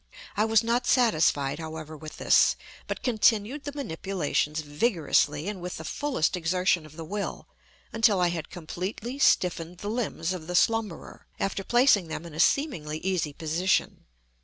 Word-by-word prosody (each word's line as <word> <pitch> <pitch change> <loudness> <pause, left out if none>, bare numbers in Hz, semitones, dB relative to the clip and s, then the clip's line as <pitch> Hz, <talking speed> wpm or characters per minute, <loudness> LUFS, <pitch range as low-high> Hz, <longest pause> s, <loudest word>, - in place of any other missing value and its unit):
I 210 - +2
was 225 0 +3
not 240 +2 0
satisfied, 155 - +2
however, 160 -1 -7
with 155 0 -10
this, - - +4 0.3
but - - -4
continued 230 +3 +2
the 290 - -3
manipulations 160 - -2
vigorously, 150 -1 +1
and 205 -3 -4
with 180 +1 -5
the - - -7
fullest 265 - -1
exertion 180 -1 +1
of 155 - -16
the 165 - -6
will, 205 +4 -4 0.5
until 225 -3 +3
I 175 -1 +3
had 170 -2 -4
completely 190 - -5
stiffened 180 -7 +2
the 205 +3 -4
limbs 205 -7 -2
of 165 -4 -7
the 180 - -3
slumberer, 220 -3 0
after 195 0 -2
placing 240 -5 +4
them 160 +1 -6
in 170 - -10
a 155 - -7
seemingly 170 - +1
easy 180 -5 -1
position. 165 +5 0
180 Hz, 160 wpm, -27 LUFS, 160-220 Hz, 0.5 s, this